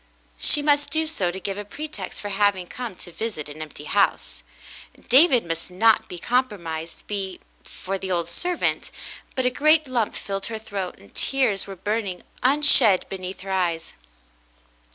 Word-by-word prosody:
She 295 Hz, -, +4 dB
must 290 Hz, 0 st, +3 dB
do 320 Hz, 0 st, +1 dB
so 205 Hz, -, -1 dB
to 185 Hz, +2 st, -5 dB
give 195 Hz, +1 st, -4 dB
a -, -, -4 dB
pretext 300 Hz, +9 st, -7 dB
for 205 Hz, -, -5 dB
having 200 Hz, -2 st, +2 dB
come 235 Hz, +1 st, -6 dB
to 175 Hz, -, -10 dB
visit 190 Hz, -6 st, -5 dB
an 150 Hz, +1 st, -9 dB
empty 155 Hz, -1 st, -8 dB
house. 200 Hz, +6 st, 0 dB, 0.7 s
David 260 Hz, -, +6 dB
must 165 Hz, +1 st, -4 dB
not 220 Hz, +5 st, +3 dB
be 180 Hz, -, -6 dB
compromised 170 Hz, -8 st, -2 dB
be 195 Hz, -3 st, -3 dB, 0.2 s
fore 195 Hz, +1 st, -5 dB
the 190 Hz, 0 st, -4 dB
old 170 Hz, -2 st, 0 dB
servant, 355 Hz, -, -1 dB, 0.5 s
but 260 Hz, -, 0 dB
a 250 Hz, -, +3 dB
great 305 Hz, +3 st, +4 dB
lump 240 Hz, -4 st, -1 dB
filled 195 Hz, -1 st, -3 dB
her 225 Hz, -, -4 dB
throat, 200 Hz, -4 st, -5 dB
and 100 Hz, 0 st, -18 dB
tears 255 Hz, -9 st, +1 dB
were 195 Hz, -, -7 dB
burning 200 Hz, -1 st, -3 dB, 0.2 s
unshed 260 Hz, -7 st, +5 dB
beneath 185 Hz, 0 st, -6 dB
her 195 Hz, 0 st, -6 dB
eyes. 170 Hz, -3 st, -1 dB
200 Hz, 165 wpm, -24 LUFS, 180-250 Hz, 0.7 s, David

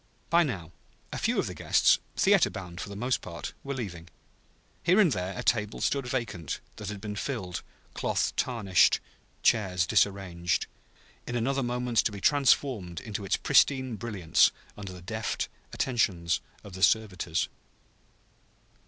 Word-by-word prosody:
By 170 Hz, +1 st, +6 dB
now, 95 Hz, -, -2 dB, 0.4 s
a -, -, -3 dB
few -, -, +1 dB
of -, -, +2 dB
the -, -, -5 dB
guests, -, -, +4 dB, 0.2 s
theater -, -, +5 dB
bound, 90 Hz, -1 st, -7 dB
for -, -, -6 dB
the 100 Hz, -, -7 dB
most 125 Hz, +5 st, 0 dB
part, 85 Hz, -2 st, -7 dB
were 140 Hz, 0 st, -4 dB
leaving. 90 Hz, -9 st, -6 dB, 0.7 s
Here 180 Hz, +4 st, +4 dB
and 185 Hz, -7 st, +5 dB
there 95 Hz, -1 st, -2 dB
a 125 Hz, -, -3 dB
table 105 Hz, -4 st, +1 dB
stood 140 Hz, -3 st, 0 dB
vacant, 115 Hz, -, -3 dB, 0.2 s
that -, -, -5 dB
had 105 Hz, -1 st, -5 dB
been 105 Hz, 0 st, -5 dB
filled, 95 Hz, -6 st, -3 dB, 0.3 s
cloth -, -, 0 dB
tarnished, 100 Hz, -8 st, +3 dB, 0.4 s
chairs 95 Hz, -6 st, +3 dB
disarranged: 90 Hz, -3 st, +1 dB, 0.6 s
in 120 Hz, -, -3 dB
another 135 Hz, +4 st, 0 dB
moment 125 Hz, -1 st, -2 dB
to -, -, +3 dB
be 100 Hz, -, -7 dB
transformed 120 Hz, -, +2 dB
into 105 Hz, +3 st, -5 dB
its 95 Hz, -, +1 dB
pristine 130 Hz, -4 st, +3 dB
brilliance 100 Hz, -6 st, +2 dB, 0.2 s
under 100 Hz, -2 st, -7 dB
the 90 Hz, -1 st, -11 dB
deft 110 Hz, +2 st, -3 dB, 0.2 s
attentions 90 Hz, -10 st, 0 dB, 0.2 s
of 100 Hz, -, -11 dB
the 95 Hz, -, -7 dB
servitors. 90 Hz, -6 st, +2 dB
105 Hz, 150 wpm, -28 LUFS, 90-125 Hz, 0.7 s, By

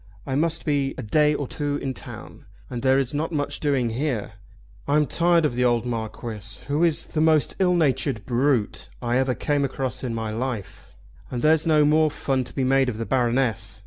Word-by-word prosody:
I 135 Hz, -, -3 dB
must 165 Hz, +4 st, 0 dB
be 140 Hz, -3 st, 0 dB
a -, -, -5 dB
day 150 Hz, +7 st, +3 dB
or 145 Hz, -, -3 dB
two 145 Hz, +1 st, -2 dB
in 135 Hz, -2 st, -3 dB
town, -, -, -10 dB, 0.3 s
and 120 Hz, -, -4 dB
there 130 Hz, 0 st, +4 dB
is 135 Hz, -1 st, -1 dB
not 155 Hz, +3 st, -2 dB
much 145 Hz, -3 st, -2 dB
doing 135 Hz, -6 st, +1 dB
here. 125 Hz, -4 st, -2 dB, 0.6 s
I'm 150 Hz, +1 st, +3 dB
tired 170 Hz, +2 st, +3 dB
of 150 Hz, -, 0 dB
the 125 Hz, +1 st, 0 dB
old 120 Hz, -1 st, +2 dB
Marquis 110 Hz, -2 st, -5 dB
who 145 Hz, +4 st, +1 dB
is 165 Hz, -1 st, +2 dB
the 155 Hz, -, -2 dB
most 155 Hz, -2 st, +3 dB
illnatured 155 Hz, -, +1 dB
brute 120 Hz, -, 0 dB
I 120 Hz, -, 0 dB
ever 130 Hz, -1 st, +1 dB
came 145 Hz, -1 st, 0 dB
across 135 Hz, -1 st, -3 dB
in 120 Hz, -3 st, -2 dB
my 110 Hz, -1 st, -3 dB
life, 115 Hz, -3 st, -5 dB, 0.3 s
and 120 Hz, -, -4 dB
there's 155 Hz, +1 st, +4 dB
no 155 Hz, -2 st, +5 dB
more 155 Hz, +1 st, +4 dB
fun 135 Hz, -3 st, -1 dB
to -, -, -10 dB
be 135 Hz, -, 0 dB
made 135 Hz, 0 st, +3 dB
of 110 Hz, -, -5 dB
the 115 Hz, -, -3 dB
Baroness. 125 Hz, -3 st, 0 dB
135 Hz, 200 wpm, -24 LUFS, 120-150 Hz, 0.6 s, no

